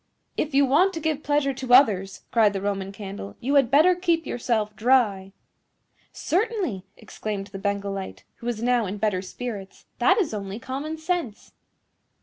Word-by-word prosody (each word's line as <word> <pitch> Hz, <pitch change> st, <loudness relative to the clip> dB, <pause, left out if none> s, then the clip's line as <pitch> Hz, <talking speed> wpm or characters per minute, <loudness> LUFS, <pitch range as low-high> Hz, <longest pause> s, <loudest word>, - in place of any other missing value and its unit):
"If 300 Hz, -2 st, -2 dB
you 280 Hz, 0 st, +6 dB
want 335 Hz, +9 st, +3 dB
to -, -, -2 dB
give 310 Hz, -2 st, -1 dB
pleasure 290 Hz, -2 st, +1 dB
to 260 Hz, -1 st, -2 dB
others," 195 Hz, -8 st, +3 dB
cried 220 Hz, -3 st, +4 dB
the 195 Hz, -, -3 dB
Roman 195 Hz, -1 st, -2 dB
Candle, 195 Hz, -, -8 dB
"you 270 Hz, +4 st, -1 dB
had 275 Hz, -5 st, +4 dB
better 310 Hz, +7 st, +6 dB
keep 345 Hz, -2 st, 0 dB
yourself 220 Hz, -3 st, -1 dB
dry." 215 Hz, -5 st, +2 dB, 0.8 s
"Certainly," 370 Hz, -, -1 dB
exclaimed 205 Hz, -2 st, -5 dB
the 195 Hz, -, -5 dB
Bengal 200 Hz, 0 st, -2 dB
Light, 195 Hz, -1 st, -6 dB
who 235 Hz, -, -8 dB
was 235 Hz, -2 st, -2 dB
now 245 Hz, -3 st, +2 dB
in 200 Hz, +3 st, -4 dB
better 205 Hz, -3 st, 0 dB
spirits; 200 Hz, 0 st, -7 dB
"that -, -, +4 dB
is 360 Hz, -, 0 dB
only 200 Hz, -1 st, -5 dB
common 275 Hz, +6 st, -5 dB
sense." 315 Hz, -, -3 dB
235 Hz, 165 wpm, -25 LUFS, 200-290 Hz, 0.8 s, you